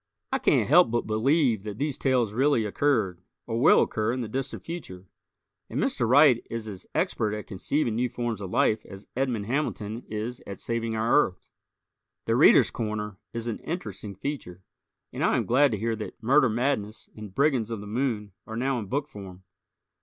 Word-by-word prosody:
I - - +1
can't - - +3
help 175 +3 +6
but 120 +1 0
believe 115 +1 +2
that 105 0 -7
these 145 +1 -1
tales 125 -6 +1
really 130 -2 +2
occurred, 105 -6 0 0.2
or 115 0 -2
will - - +6
occur 110 +1 -1
in 125 +1 -2
the 115 - -3
distant 135 +3 -4
future. 95 - -7 0.6
And - - -3
Mr. 120 - 0
Wright 135 -2 +6
is 115 -1 -5
as 100 -4 -9
expert 105 -1 0
at 105 - -6
conceiving 115 +6 -1
new 125 +1 +1
forms 120 -3 -3
of 95 - -5
life 110 +3 +2
as 95 0 -11
Edmond 125 -5 -1
Hamilton 115 -3 -2
is 110 +3 -4
at 100 - -7
saving 115 -1 -2
our 110 +2 +2
Earth. 90 - -8 0.8
"The - - +1
Readers' - - +6
Corner" 105 -3 -4
is 115 0 -5
an 115 -2 -3
interesting 105 - -6
feature, 95 -6 -6 0.5
and - - -3
I - - +3
am - - 0
glad 140 +4 +4
to 110 - -2
hear 115 +2 -1
that 110 +2 -8
"Murder 130 +2 +4
Madness" 115 -2 -1
and 105 -3 -10
"Brigands 135 -6 +2
of 115 -2 -4
the 105 - -8
Moon" 110 -2 -2 0.2
are 110 - -5
now 130 +1 0
in 105 - -6
book 140 +6 -2
form. 95 -2 -11
115 Hz, 190 wpm, -27 LUFS, 105-130 Hz, 0.8 s, help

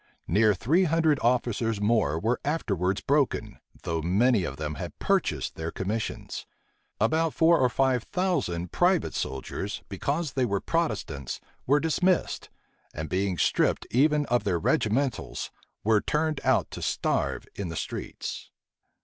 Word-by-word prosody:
Near 105 +3 +4
three 160 - +2
hundred 160 -3 +3
officers 115 -2 +1
more 105 -8 +2
were 115 +7 0
afterwards 100 - 0
broken, 130 -7 0 0.2
though 80 -1 -1
many 100 +6 +3
of 70 - -5
them 75 -1 -3
had - - -6
purchased - - 0
their 80 0 -4
commissions: 105 +6 -4 0.5
about 160 +8 +2
four 165 +1 +5
or 125 - +4
five 130 +1 +2
thousand 110 - -1
private 175 0 +2
soldiers, 70 +9 -4
because 140 - -2
they 130 - +1
were 100 -5 +1
Protestants, 105 - -2 0.3
were 145 +3 +5
dismissed; 180 +4 +1 0.5
and 80 0 -4
being 95 -1 0
stripped - - +2
even 150 +3 +3
of 120 -1 +1
their 95 -4 +1
regimentals, 115 - 0 0.3
were 110 -1 +4
turned 155 -1 0
out - - +2
to - - -7
starve - - -1
in 100 -4 -4
the 80 - -5
streets. - - -5
115 Hz, 140 wpm, -27 LUFS, 95-150 Hz, 0.5 s, four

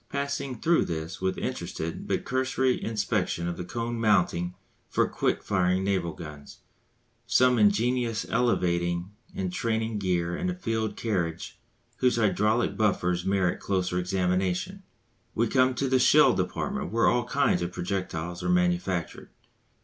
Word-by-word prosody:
Passing 140 -3 -3
through 170 +1 +3
this 80 +3 -5
with 95 0 -1
interested 80 +1 -4
but - - -1
cursory 130 0 0
inspection 100 -5 -1
of 85 - -2
the 90 - -5
cone 115 +5 -4
mountings 90 -4 +2 0.3
for - - +2
quick - - -1
firing 90 0 +1
naval 95 -4 0
guns, 75 -3 -10 0.7
some 125 0 +4
ingenious 115 +2 +2
elevating 85 -6 0 0.2
and 95 -2 -3
training 110 0 -1
gear 90 -3 0
and 185 - -2
a 180 - -2
field 110 - -2
carriage 90 -3 -3 0.4
whose 125 -1 +2
hydraulic 110 +1 +1
buffers 90 -5 +1
merit 95 -2 +1
closer 90 -2 -1
examination, 90 0 -1 0.5
we 115 - +2
come 130 +1 +3
to 135 +2 0
the 130 0 +3
shell - - +6
department - - -2
where 115 +1 +2
all 120 -1 +2
kinds 140 -2 +1
of 85 +1 -2
projectiles 90 -2 -4
are - - -2
manufactured. 175 - 0
100 Hz, 140 wpm, -27 LUFS, 90-120 Hz, 0.7 s, shell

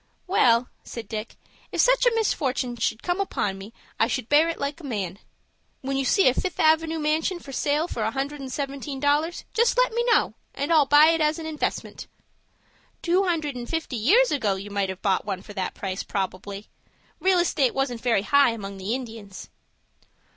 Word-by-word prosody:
"Well," 245 -10 +3 0.2
said 230 -1 -8
Dick, 215 0 -6 0.4
"if - - -4
such - - +4
a 470 - +3
misfortin' 270 - 0
should 220 0 -1
come 355 +2 0
upon 195 - -2
me 200 +3 -10 0.3
I 225 - +4
should 250 -2 -3
bear 305 +3 +5
it 335 - -3
like 285 +3 -3
a - - -14
man. 200 - -4 0.6
When 270 +1 -3
you 270 0 0
see 390 +7 +4
a 255 - +5
Fifth 365 +6 -3
Avenoo 320 +1 +3
manshun 315 +4 0
for 280 - -11
sale 295 +4 0
for 235 - -5
a 215 - +1
hundred 275 +3 -4
and 265 -1 -6
seventeen 275 0 -4
dollars, 295 +4 0
just 470 +2 +2
let - - +3
me 475 +1 +1
know 470 - +3 0.2
and 285 +4 0
I'll 300 -4 +5
buy 295 +3 +7
it 330 -1 +2
as 305 0 +2
an 325 - -6
investment." 315 -1 -4 1.0
"Two 365 +3 +2
hundred 315 -6 -1
and 240 -1 -6
fifty 325 -5 -3
years 410 - +4
ago 220 -9 +1
you 200 +2 -8
might 200 -1 -1
have 190 0 -7
bought 195 -2 +1
one 195 -2 -4
for 205 - -11
that 190 -2 -3
price, 190 -1 -4
probably. 195 +1 -4 0.5
Real 375 -1 +3
estate 300 -7 +1
wasn't 260 -4 -1
very 230 -5 +2
high 280 0 +4
among 200 -3 -7
the 195 +5 -2
Indians." 225 -6 -8
275 Hz, 195 wpm, -25 LUFS, 220-325 Hz, 1.0 s, buy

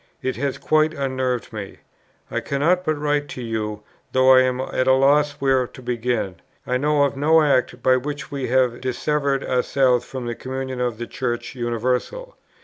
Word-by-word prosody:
It 130 - -1
has 140 +1 -2
quite 155 0 +2
unnerved 130 -4 -2
me.... 100 -3 -7 0.5
I - - 0
cannot 165 +6 +1
but 155 -2 0
write 145 0 0
to - - -5
you, 105 -2 -3 0.3
though 130 0 +6
I 130 - +7
am 130 0 0
at 130 0 -1
a 130 - +6
loss 145 +2 +3
where 135 -3 +1
to 130 - -13
begin.... 120 -6 -2 0.3
I 125 - 0
know 145 +2 +2
of 140 -1 0
no 155 +3 +4
act 130 -4 +1
by 130 0 +5
which 145 +3 -5
we 140 -2 -3
have 125 -1 +1
dissevered 140 +2 -1
ourselves 125 -1 +2
from 130 -1 -7
the 120 - -2
communion 130 +1 -5
of 120 -3 -1
the 120 - -4
Church 120 +1 -4
Universal.... 125 - -2
130 Hz, 180 wpm, -22 LUFS, 125-145 Hz, 0.5 s, I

